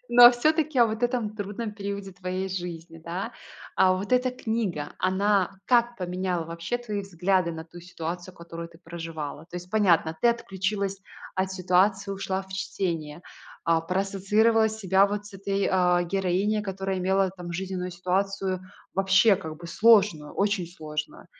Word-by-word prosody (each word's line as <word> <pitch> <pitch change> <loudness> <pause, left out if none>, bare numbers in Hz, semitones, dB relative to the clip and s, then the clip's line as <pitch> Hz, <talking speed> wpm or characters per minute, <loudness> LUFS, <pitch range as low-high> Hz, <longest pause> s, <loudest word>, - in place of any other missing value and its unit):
но, 240 0 +8
а - - +11
всё-таки 310 +3 +1
о 235 - +7
вот 220 +2 -4
этом 240 -4 0
трудном 210 +2 -4
периоде 200 -2 -5
твоей 185 +1 -3
жизни, 170 -3 -6
да. 185 +7 -4 0.4
А 185 0 +5
вот 195 +6 -4
эта 250 0 +3
книга, 220 -11 -2
она 195 0 +1
как 240 -1 +3
поменяла 180 -1 -2
вообще 170 +8 -3
твои 215 -4 -4
взгляды 185 -2 0
на 160 0 -7
ту 175 +1 -12
ситуацию, 175 +1 -6
которую 170 0 -8
ты 165 0 -18
проживала? 165 -3 -6
То 175 0 -8
есть 180 +1 -8
понятно, 170 -6 +3
ты 240 - +5
отключилась 195 -3 -1 0.3
от 190 0 -1
ситуации, 190 +2 +2
ушла 195 0 -2
в 190 - -18
чтение, 170 -5 -3 0.4
а, 165 -1 +3
проассоциировала 200 +5 +2
себя 195 -2 +3
вот 205 0 -4
с 205 - -12
этой, 195 0 -1
а, 180 -1 +3
героиней, 195 +3 0
которая 195 -1 -3
имела 190 +1 +2
там 180 -2 -8
жизненную 185 0 -3
ситуацию 185 +1 -1 0.3
вообще 195 +2 +5
как 160 -5 -7
бы 170 - -10
сложную, 200 -6 +4
очень 200 -3 0
сложную. 155 -3 -6
190 Hz, 155 wpm, -26 LUFS, 175-205 Hz, 0.4 s, а